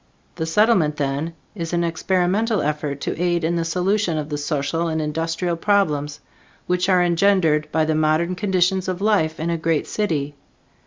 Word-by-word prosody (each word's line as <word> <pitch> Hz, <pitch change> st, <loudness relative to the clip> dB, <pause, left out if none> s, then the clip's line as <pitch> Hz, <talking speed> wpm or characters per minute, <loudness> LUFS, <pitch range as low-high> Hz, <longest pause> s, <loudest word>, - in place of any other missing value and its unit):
The 160 Hz, -2 st, -4 dB
Settlement 180 Hz, -4 st, +3 dB
then, 145 Hz, +3 st, -2 dB, 0.2 s
is 170 Hz, -4 st, -5 dB
an 170 Hz, 0 st, +1 dB
experimental 185 Hz, +6 st, 0 dB
effort 150 Hz, -1 st, -2 dB
to -, -, -3 dB
aid 175 Hz, -1 st, +1 dB
in 165 Hz, +2 st, 0 dB
the 170 Hz, -, 0 dB
solution 180 Hz, +1 st, 0 dB
of 150 Hz, 0 st, -4 dB
the 145 Hz, -, -2 dB
social 150 Hz, +3 st, -1 dB
and 160 Hz, -1 st, -1 dB
industrial 165 Hz, +3 st, -2 dB
problems 150 Hz, -6 st, 0 dB, 0.4 s
which 180 Hz, +1 st, 0 dB
are 180 Hz, -1 st, +4 dB
engendered 170 Hz, -4 st, +2 dB
by 160 Hz, 0 st, +2 dB
the 155 Hz, -, 0 dB
modern 155 Hz, +3 st, +1 dB
conditions 185 Hz, -1 st, +1 dB
of 185 Hz, -1 st, -2 dB
life 195 Hz, -7 st, +1 dB
in 165 Hz, +2 st, -1 dB
a 165 Hz, -, -1 dB
great 160 Hz, -2 st, 0 dB
city. 150 Hz, -9 st, -2 dB
165 Hz, 170 wpm, -21 LUFS, 155-185 Hz, 0.4 s, are